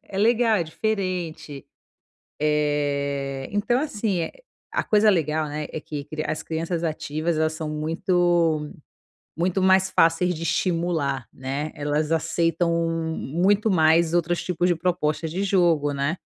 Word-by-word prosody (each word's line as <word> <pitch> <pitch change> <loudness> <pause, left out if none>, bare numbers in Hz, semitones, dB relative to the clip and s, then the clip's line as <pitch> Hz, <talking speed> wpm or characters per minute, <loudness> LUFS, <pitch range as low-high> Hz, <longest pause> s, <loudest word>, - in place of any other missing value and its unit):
é 195 - -7
legal, 225 +1 +3
é 170 - 0
diferente. 180 -6 -3 0.7
Eh, 140 -2 -1
então, 215 +5 +1
assim, 210 - -1 0.4
a - - -1
coisa 215 0 +4
legal, 155 -5 +1
né, 150 +1 -4
é 160 - -4
que 150 -2 -6 0.2
as 155 - -3
crianças 165 +1 -3
ativas, 155 +1 -2
elas 155 0 +1
são 155 -1 -4
muito 165 0 +1 0.7
muito 180 +3 0
mais 190 0 +4
fáceis 165 +2 +3
de 165 0 -6
estimular, 165 -6 0
né. 135 +4 -4
Elas 150 +1 -1
aceitam 165 +1 +1 0.5
muito 195 +9 +1
mais 165 -2 +4
outros 175 0 +1
tipos 180 0 0
de 175 - +3
propostas 165 -2 -1
de 185 +5 -2
jogo, 175 -7 +2
né? 140 +4 -1
165 Hz, 135 wpm, -24 LUFS, 150-185 Hz, 0.7 s, coisa